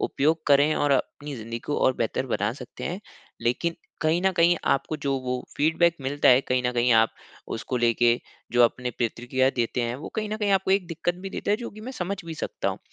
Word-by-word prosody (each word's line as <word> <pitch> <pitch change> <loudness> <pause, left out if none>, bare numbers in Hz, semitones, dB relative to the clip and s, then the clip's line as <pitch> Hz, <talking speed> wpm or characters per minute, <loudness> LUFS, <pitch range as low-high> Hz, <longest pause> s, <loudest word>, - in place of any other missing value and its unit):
उपयोग 155 +3 +1
करें 145 +2 +5
और 145 -1 +1
अपनी 145 +1 -2
ज़िंदगी 115 +1 -5
को 145 - -3
और 130 - +4
बेहतर 115 +3 -1
बना 105 -3 0
सकते 125 -2 -9
हैं, 180 +3 -3 0.4
लेकिन 165 +8 0 0.2
कहीं 160 +2 +2
न 190 - +4
कहीं 175 0 +4 0.2
आपको 155 +3 -1
जो 140 -1 +1
वो 125 0 -2 0.2
फ़ीडबैक 165 +3 +3
मिलता 140 +2 +1
है 130 +1 +7
कहीं 125 -1 0
न 125 - 0
कहीं 120 0 +3
आप 115 0 +5 0.5
उसको 125 - -3
लेके 120 0 +3 0.3
जो 120 0 +5
अपनी 125 +1 0
प्रतिक्रिया 120 +3 0
देते 120 -1 -1
हैं 120 0 -1
वो 145 - -7
कहीं 215 -1 -1
न 215 - -1
कहीं 210 -2 0
आपको 190 0 +2
एक 190 -2 +3
दिक्कत 170 +1 -2
भी 195 - -5
देता - - -3
है 210 - +4
जो 240 0 -6
की 215 - -12
मैं 255 +4 -7
समझ 195 -4 -3
भी 165 -1 -6
सकता - - -3
हूँ। - - -3
140 Hz, 230 wpm, -25 LUFS, 125-170 Hz, 0.5 s, है